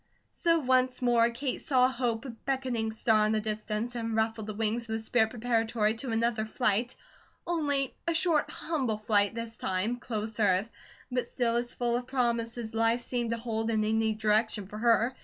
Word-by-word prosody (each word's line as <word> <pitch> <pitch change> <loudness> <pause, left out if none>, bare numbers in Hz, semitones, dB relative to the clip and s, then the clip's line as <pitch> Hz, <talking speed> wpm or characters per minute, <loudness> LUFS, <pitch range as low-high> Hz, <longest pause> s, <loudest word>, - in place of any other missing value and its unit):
So 335 -3 +2
once 255 -3 +2
more 235 -1 +4
Kate 250 +3 -3
saw 255 -4 +4
hope 240 -2 -2
a 260 - -5
beckoning 245 -2 -2
star 220 -1 +2
in 215 - +1
the 215 - +2
distance, 215 +2 -3
and 230 -2 -3
ruffled 220 -1 0
the 215 - -5
wings 225 +2 0
of - - -2
the 220 - -1
spirit 220 0 +2
preparatory 225 -2 +1
to 255 +2 -4
another 225 0 +1
flight: 225 +1 0 0.5
only 285 -6 0
a 335 - +1
short, 325 -3 +2
humble 265 -10 -2
flight 210 0 +2
this 230 -1 -5
time, 195 +7 -1
close 220 -2 -4
earth; 200 +1 +2 0.4
but 250 -1 -1
still 235 -2 0
as 240 0 -2
full 240 -1 0
of 245 0 -3
promise 235 -3 0
as 230 -1 -5
life 225 +2 +2
seemed 240 -1 -2
to 230 - -1
hold 225 -1 -2
in 220 -1 +1
any 220 0 +1
direction 215 -1 +1
for 210 +3 -8
her. 235 +2 +3
230 Hz, 190 wpm, -29 LUFS, 220-245 Hz, 0.5 s, more